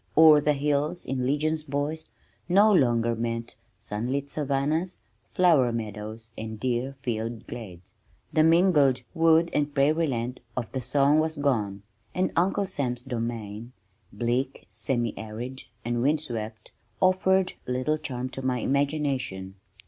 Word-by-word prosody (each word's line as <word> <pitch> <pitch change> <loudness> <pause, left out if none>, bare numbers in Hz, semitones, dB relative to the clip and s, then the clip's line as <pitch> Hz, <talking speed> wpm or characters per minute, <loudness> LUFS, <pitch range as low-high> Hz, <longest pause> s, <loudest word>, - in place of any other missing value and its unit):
"O'er 155 -2 +8
the 150 +1 +3
hills 150 +4 0
in 130 -1 -1
legions, 155 +3 0
boys," 150 +3 -3 0.4
no 205 +4 +6
longer 120 - +3
meant 115 0 -3 0.2
sunlit 130 +7 -3
savannahs, 150 +5 -1 0.3
flower 160 -9 +4
meadows 110 0 -6
and 110 -1 -6
deer 130 +2 -1
filled 115 -1 -3
glades. 95 -7 -9 0.4
The 155 - +4
mingled 160 -5 +4
"wood 165 0 +4
and 145 0 +1
prairie 150 +4 +2
land" 125 -1 -3 0.2
of 120 -3 -3
the 130 - -3
song 140 +4 +3
was 160 0 0
gone 105 -9 0 0.3
and 185 +1 +1
Uncle 195 +3 +2
Sam's 125 -8 -3
domain, 115 -2 -5 0.4
bleak, 120 +5 -2
semi 120 -4 -1
arid, 120 +4 -6 0.2
and 120 0 0
wind 150 +4 +3
swept, 110 -5 -5 0.3
offered 185 0 +3
little 130 +5 0
charm 130 -4 -4
to 135 - -7
my 130 -1 0
imagination. 135 -8 -1
135 Hz, 135 wpm, -27 LUFS, 115-155 Hz, 0.4 s, O'er